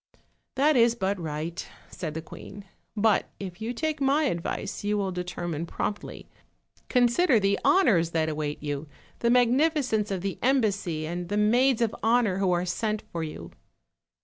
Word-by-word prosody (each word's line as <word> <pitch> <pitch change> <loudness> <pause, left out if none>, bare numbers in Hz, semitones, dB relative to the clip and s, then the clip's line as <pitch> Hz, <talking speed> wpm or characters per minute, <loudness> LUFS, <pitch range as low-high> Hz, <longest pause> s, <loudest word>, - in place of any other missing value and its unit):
"That 290 +3 +3
is 235 -1 +4
but 195 -3 -1
right," 160 +2 -4 0.3
said 160 -4 -5
the 160 - -4
queen; 200 +5 -11 0.3
"but 215 0 +2
if 190 0 -7
you 225 +2 -2
take 310 +4 -2
my 275 +3 +3
advice 170 - -3
you 210 0 0
will 195 -2 -1
determine 175 -2 -4
promptly; 205 - -4 0.6
consider 250 +2 +4
the 200 0 +1
honors 205 - +4
that 160 -1 0
await 150 -1 -3
you, 145 +1 -3 0.3
the 235 - +1
magnificence 250 -2 +2
of 190 -3 -2
the 195 0 -4
embassy, 200 - +1
and 175 +2 -4
the 205 - -1
maids 240 +3 +3
of 225 - -1
honor 225 -4 +2
who 190 -2 +2
are 175 0 +1
sent 215 +4 -2
for 165 -1 -3
yoy." 85 - -7
205 Hz, 160 wpm, -27 LUFS, 170-240 Hz, 0.6 s, is